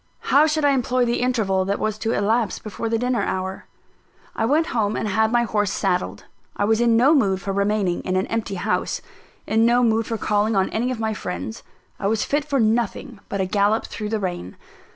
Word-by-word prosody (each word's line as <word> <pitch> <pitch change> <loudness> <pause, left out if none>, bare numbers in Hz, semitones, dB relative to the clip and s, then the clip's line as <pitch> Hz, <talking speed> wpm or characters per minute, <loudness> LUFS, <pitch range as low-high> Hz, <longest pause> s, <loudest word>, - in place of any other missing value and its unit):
How 295 +3 +6
should 305 -1 0
I 285 - +5
employ 255 -1 +1
the 240 0 0
interval 220 -7 +1
that 200 +1 -1
was 215 -1 -2
to 225 +1 -1
elapse 220 0 +1
before 225 +2 -5
the 230 - +1
dinner 245 +1 0
hour? 190 0 -3 0.7
I 225 - 0
went 300 +7 +2
home, 215 -3 0
and - - -2
had 220 +2 +1
my 240 0 +3
horse 210 -3 0
saddled. 180 - -1 0.3
I 205 - +1
was 220 +2 +2
in 235 -1 +4
no 265 +6 +5
mood 200 -10 +2
for 195 +1 -4
remaining 200 -2 0
in 185 - -2
an 185 - +1
empty 225 -3 -3
house, 180 - -2 0.4
in 220 +1 +2
no 240 +2 +4
mood 225 -1 +2
for 225 - -2
calling 210 +1 +1
on 190 -1 +1
any 240 +3 -1
of 255 -3 -3
my 220 -1 -1
friends 215 +3 -5 0.4
I 200 - -1
was 215 +1 0
fit 290 +1 0
for 280 -2 0
nothing 225 0 0
but 200 - -2
a - - +1
gallop 205 +3 +1
through 210 -1 -5
the 220 0 -1
rain. 175 - -5
220 Hz, 215 wpm, -22 LUFS, 200-240 Hz, 0.7 s, How